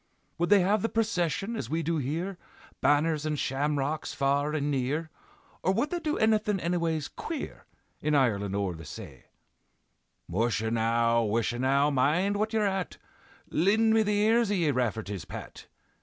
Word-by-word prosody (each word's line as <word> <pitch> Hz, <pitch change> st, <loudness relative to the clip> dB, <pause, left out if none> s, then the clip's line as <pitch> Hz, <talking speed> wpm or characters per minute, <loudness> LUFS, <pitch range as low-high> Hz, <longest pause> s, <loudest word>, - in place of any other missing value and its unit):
Would 175 Hz, -, +1 dB
they 205 Hz, -1 st, +6 dB
have 200 Hz, +3 st, +2 dB
the 225 Hz, -, 0 dB
procession, 215 Hz, -1 st, 0 dB
as 115 Hz, -, -4 dB
we 165 Hz, +2 st, -1 dB
do 165 Hz, +1 st, 0 dB
here, 165 Hz, +7 st, -3 dB, 0.4 s
Banners 150 Hz, +1 st, +2 dB
and 155 Hz, -1 st, -1 dB
shamrocks 145 Hz, +2 st, -1 dB
far 140 Hz, +2 st, +1 dB
and 145 Hz, -1 st, -1 dB
near, 145 Hz, +4 st, -1 dB, 0.5 s
Or 190 Hz, -, +2 dB
would 235 Hz, +9 st, 0 dB
they 350 Hz, -, -1 dB
do 310 Hz, -2 st, -1 dB
annything 215 Hz, -2 st, +2 dB
annyways 165 Hz, -3 st, -1 dB
queer, 320 Hz, -3 st, -6 dB, 0.3 s
In 150 Hz, 0 st, +1 dB
Ireland 100 Hz, -7 st, +1 dB
o'er 100 Hz, -3 st, -1 dB
the 80 Hz, 0 st, -10 dB
say?" -, -, -10 dB, 1.0 s
"Musha 110 Hz, +3 st, 0 dB
now! 115 Hz, +1 st, +2 dB
wisha 115 Hz, +2 st, 0 dB
now! 140 Hz, +3 st, +3 dB
mind 155 Hz, +10 st, +2 dB
what 215 Hz, +1 st, 0 dB
ye're 220 Hz, -2 st, +1 dB
at! 190 Hz, -2 st, -2 dB, 0.5 s
Lind 215 Hz, +6 st, +3 dB
me 220 Hz, -, +5 dB
the 210 Hz, -1 st, +1 dB
ears 225 Hz, +1 st, +3 dB
of 205 Hz, -, +1 dB
ye, 165 Hz, -4 st, +2 dB
Rafferty's 110 Hz, -, -2 dB
Pat! -, -, -9 dB
155 Hz, 160 wpm, -28 LUFS, 130-200 Hz, 1.0 s, they